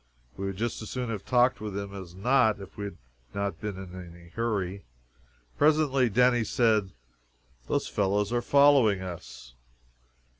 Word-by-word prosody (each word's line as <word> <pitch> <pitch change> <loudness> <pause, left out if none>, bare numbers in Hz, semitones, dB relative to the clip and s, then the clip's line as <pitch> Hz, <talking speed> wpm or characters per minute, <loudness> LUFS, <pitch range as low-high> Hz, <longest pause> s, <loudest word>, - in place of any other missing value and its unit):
We 95 - -4
would 95 -1 -4
just 115 +2 -2
as 110 - -7
soon 125 -2 -3
have 105 -3 -4
talked 125 -1 +3
with 105 -2 -4
him 100 -1 -5
as 95 -3 -9
not 110 +1 +3
if 95 -2 -11
we 105 - -5
had 100 - -7 0.4
not 100 0 -3
been 105 -3 -4
in 95 -2 -9 0.2
a 85 0 -15
hurry. 100 -3 -2 0.8
Presently 145 -4 +3
Denny 125 +2 +3
said, 110 -4 +2 0.8
"Those - - 0
fellows 100 +2 0
are 120 - +1
following 135 -9 +4
us!" 60 -9 -9
105 Hz, 155 wpm, -28 LUFS, 95-120 Hz, 0.8 s, following